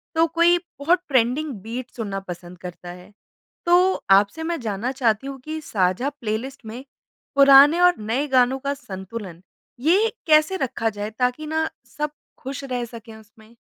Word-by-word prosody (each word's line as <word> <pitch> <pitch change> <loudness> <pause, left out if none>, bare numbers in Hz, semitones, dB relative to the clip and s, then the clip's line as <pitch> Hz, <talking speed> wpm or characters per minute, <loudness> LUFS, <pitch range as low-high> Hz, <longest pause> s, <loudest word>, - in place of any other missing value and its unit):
तो 325 - +4
कोई 340 +2 +4 0.2
बहुत 340 +5 +3
ट्रेंडिंग 265 +3 +1
बीट 235 +4 -6
सुनना 205 -4 -4
पसंद 180 -1 -9
करता 180 0 -9
है। 180 +3 -11 0.5
तो 360 +2 +4 0.2
आपसे 200 +11 +4
मैं 335 0 -2
जानना 220 +3 -2
चाहती 255 -1 0
हूँ 275 -1 -7
कि 315 0 -4
साझा 195 +2 0
प्लेलिस्ट 260 -1 -5
में 230 +4 -8 0.5
पुराने 280 +4 +7
और 355 0 +5
नए 235 +7 -1
गानों 260 0 +3
का 280 +1 -2
संतुलन 190 - -8 0.4
ये 385 - +3 0.2
कैसे 310 +5 +4
रखा 235 -6 -1
जाए 205 0 -5
ताकि 250 +5 0
ना 315 +1 -1 0.3
सब 300 0 -2 0.3
खुश 270 +1 -6
रह 250 -3 -3
सके 225 -1 -11
उसमें? 220 +1 -18
255 Hz, 160 wpm, -23 LUFS, 215-300 Hz, 0.5 s, पुराने